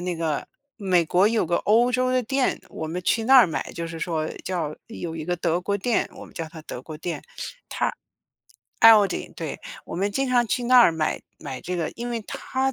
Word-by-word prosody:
那 180 -1 -1
个 160 -3 -2 0.3
美 185 -5 +2
国 185 +5 +4
有 225 -6 +1
个 170 - +1
欧 235 +4 +3
洲 255 0 +1
的 255 -1 +2
店， 265 +3 0
我 160 - -6
们 175 +3 -4
去 225 +5 +1
那 265 +2 +7
儿 245 - +8
买， 160 - -4
就 170 -1 -4
是 165 0 -7
说 160 -1 -2 0.2
叫 165 -5 -2
有 170 -7 -6
一 155 - -5
个 175 +1 0
德 170 0 0
国 200 +1 -1
店， 240 +3 +1
我 - - -10
们 - - -18
叫 165 -2 -4
它 160 - -10
德 130 -4 -8
国 155 - -8
店， 165 -3 -4 1.6
它 225 - +10
ALDI， 200 -3 +1
对， 160 -4 -5 0.2
我 - - -7
们 195 +3 0
经 270 +6 0
常 240 -2 +3
去 245 - -1
那 250 +1 +6
儿 180 - +7
买 155 -1 -1 0.2
买 135 -3 -6
这 180 +1 -4
个， 165 - -2
因 240 +1 -5
为 230 -2 -3
它 265 0 -2
180 Hz, 250 characters per minute, -24 LUFS, 165-235 Hz, 1.6 s, 它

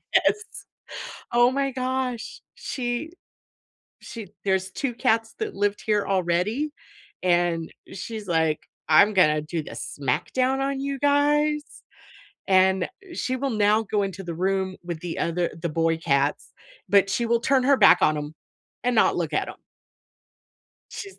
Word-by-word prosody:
Yes. 425 - +3 0.9
Oh 240 +1 +5
my 275 0 0
gosh, 255 -1 -3
she 245 +4 -4 0.9
she 225 -4 -9 0.2
there's 190 -1 0
2 265 +4 -3
cats 225 -2 +1
that 430 -1 -3
lived 205 0 0
here 210 -2 +1
already, 195 - 0 0.5
and 175 -2 +1 0.2
she's 215 +2 -6
like, 160 -3 +1 0.3
"I'm 200 +7 +6
gonna 155 -5 +4
do 160 +2 -4
the - - -10
smackdown 255 - -1
on 275 0 -1
you 275 0 -3
guys," 295 +1 +2 0.8
and 190 0 +4 0.3
she 260 -6 -2
will 270 +1 -2
now 210 0 +3
go 210 -1 0
into 195 0 -5
the 170 - -5
room 190 +1 -1
with 170 -2 -5
the 175 -2 -5
other 170 +1 0
the 170 - -1
boy 165 +1 +1
cats, 145 -3 0 0.4
but 200 -1 +4
she 235 +5 0
will 235 0 +2
turn 265 -2 +2
her 275 +1 +4
back - - +7
on 155 0 +3
'em 150 +1 -5 0.5
and 245 -1 +1
not - - +4
look - - -2
at - - 0
'em. - - -10 1.3
She's 395 -1 -8
205 Hz, 145 wpm, -25 LUFS, 175-260 Hz, 1.3 s, back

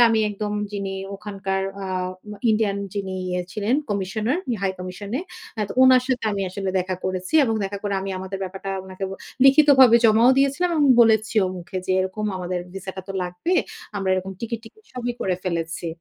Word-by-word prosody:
আমি 225 -1 +2
একদম 210 +1 -4 0.2
যিনি 195 -1 -3 0.2
ওখানকার 195 -1 -3 0.2
আ - - -4 0.6
ই - - +5
ইন্ডিয়ান 210 -2 +1 0.2
যিনি 190 -2 -3 0.2
ইয়ে 180 0 -1
ছিলেন 215 +4 0 0.2
কমিশনার, 210 - -1 0.2
হাই 190 - +1
কমিশনে। 200 - -5 0.4
হ্যাঁ, 210 -2 -1
তো - - -5
উনার 255 -1 +7
সাথে 250 -3 0
আমি 200 -1 -1
আসলে 195 0 -3
দেখা 185 +1 -2
করেছি 185 +7 -3
এবং 225 - 0
দেখা 200 +1 -4
করে 205 -1 -1
আমি 195 0 -4
আমাদের 190 +1 -5
ব্যাপারটা 190 +1 -6
উনাকে 190 +1 -6 0.4
লিখিতভাবে 270 -4 +7
জমাও 225 +3 +6
দিয়েছিলাম 280 +6 +2
এবং 295 - +4 0.2
বলেছি 220 0 +3
ও - - +1
মুখে 180 +2 -5
যে 185 - +1
এরকম 190 +3 -3
আমাদের 180 0 -3 0.2
ভিসাটা 190 0 -6
তো 195 - -3
লাগবে। 180 - -3 0.4
আমরা 195 -1 -2
এরকম 185 +1 -3
টিকিট 230 0 -3
টিকিট 435 - -16
সবই 245 -1 -3
করে 185 -2 +1
ফেলেছি। 170 -1 -3
200 Hz, 180 wpm, -23 LUFS, 190-230 Hz, 0.6 s, উনার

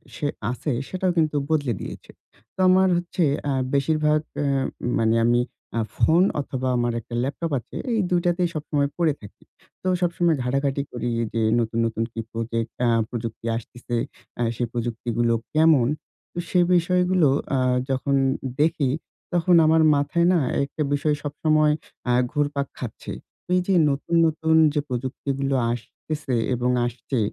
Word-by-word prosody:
সে 145 - -2 0.2
আছে, 140 +3 -3 0.2
সেটাও 185 0 0
কিন্তু 155 -2 +2
বদলে 145 -7 +1
দিয়েছে। - - -8 0.4
তো - - -19
আমার 190 +1 +5
হচ্ছে 175 0 -1 0.3
আ - - +1 0.2
বেশিরভাগ 150 +1 +2 0.2
এ - - 0 0.5
মানে 115 0 +3
আমি, 120 +1 +4 0.4
আ - - +2 0.2
ফোন 170 +3 +4 0.2
অথবা 130 -2 -4
আমার 120 0 +1
একটা 120 - -12
ল্যাপটপ 150 +4 -3
আছে, 115 - -15 0.2
এই 225 - +1
২ 180 - +3
টাতেই 175 0 +2
সবসময় 145 -2 0
পড়ে 165 -4 +2
থাকি। 100 - -14 0.4
তো 185 - -4
সবসময় 170 -2 +2
ঘাটাঘাটি 135 +2 0
করি 120 0 -3 0.2
যে, 115 - 0 0.2
নতুন, 115 0 -1
নতুন 115 0 -1
কি - - -5
প্রজেক্ট 115 0 -3 0.2
আ - - +3 0.2
প্রযুক্তি 115 -1 -5
আসতেছে? 120 +1 -6 0.4
আ - - 0
সেই 120 0 -1
প্রযুক্তিগুলো 120 0 -1 0.2
কেমন? 155 -6 +5 0.6
সেই 180 -1 +3
বিষয়গুলো 180 -1 +3 0.3
আ - - +2 0.3
যখন 135 +1 0 0.5
দেখি, 155 -3 +2 0.4
তখন 175 0 +4
আমার 160 +1 +5
মাথায় 145 +4 +1
না? 175 - +4 0.2
একটা 140 +3 -5
বিষয় 150 +1 +1
সবসময় 155 +1 +2 0.4
আ - - +4 0.2
ঘুরপাক 145 -1 -1
খাচ্ছে। 120 -4 -7 0.4
এই 180 - +4
যে, 195 - +3 0.2
নতুন, 145 +4 -1
নতুন 160 +1 +1 0.2
যে, 150 - +1
প্রযুক্তিগুলো 135 +2 -2 0.2
আসতেছে 130 +3 -4 0.2
এবং 125 +1 0 0.2
আসছে, 120 +2 -3
145 Hz, 145 wpm, -24 LUFS, 120-160 Hz, 0.6 s, আমার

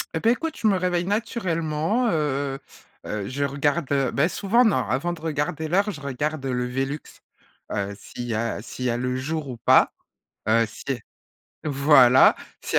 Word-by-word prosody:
Et - - +1
ben, 230 - +3
écoute, 325 +6 -2
je - - -5
me 200 - +4
réveille 180 -1 0
naturellement, 200 -1 0
heu 145 -4 -1 0.5
heu 105 -2 -4
je 140 +2 -2
regarde, 145 +2 0
heu 135 -2 +2
ben, 150 +4 +2
souvent, 220 +6 +2
non! 220 - +3
Avant 170 +7 -1
de 165 - -10
regarder 155 0 -2
l'heure, 200 +5 +2
je 150 -5 -9
regarde 140 +2 -3
le 125 -1 -1
velux, 135 +4 -2 0.7
heu, 100 0 -2
s'il 120 - -9
y 115 - -3
a 115 -1 -2
s'il 125 +1 -6
y - - +2
a 120 - 0
le 125 +1 -2
jour 150 +2 -3
ou 120 - -6
pas. - - +4 0.6
Heu, 115 +1 +4
si 110 - -12 0.8
euh - - 0
voilà! 135 -2 +6 0.3
S'il - - -3
145 Hz, 185 wpm, -24 LUFS, 130-175 Hz, 0.8 s, voilà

